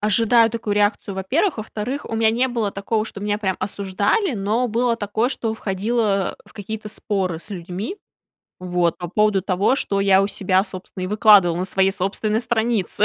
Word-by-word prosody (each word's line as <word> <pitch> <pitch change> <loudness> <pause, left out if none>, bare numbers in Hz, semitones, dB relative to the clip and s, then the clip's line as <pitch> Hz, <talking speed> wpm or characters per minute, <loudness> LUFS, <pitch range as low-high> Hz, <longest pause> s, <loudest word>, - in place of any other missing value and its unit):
ожидаю 225 +2 +4
такую 215 -2 -2
реакцию, 205 -1 0
во-первых, 250 - 0
во-вторых, 220 +6 -4
у - - -4
меня 220 0 +3
не 250 +3 +1
было 230 -4 -1
такого, 215 +2 -1
что 200 - -8
меня 205 0 -1
прям 190 -3 -1
осуждали. 200 - 0
Но 220 +5 0
было 235 +1 +1
такое, 220 +3 -1
что 225 -5 -3
входило 200 -1 -1
в - - -20
какие-то 210 +1 -6
споры 195 -5 -2
с 190 - -11
людьми. 190 - -5 0.6
Вот. 180 -2 0
По 175 - -5
поводу 210 0 +2
того, 195 +7 +1
что 200 -7 -1
я 195 -1 +4
у - - +1
себя, 190 -1 +1
собственно, 185 -1 -7
и - - -2
выкладывала 205 -4 +5
на 180 - -1
своей 190 0 +2
собственной 210 +3 -1
странице. 225 -4 +1
205 Hz, 180 wpm, -21 LUFS, 190-225 Hz, 0.6 s, выкладывала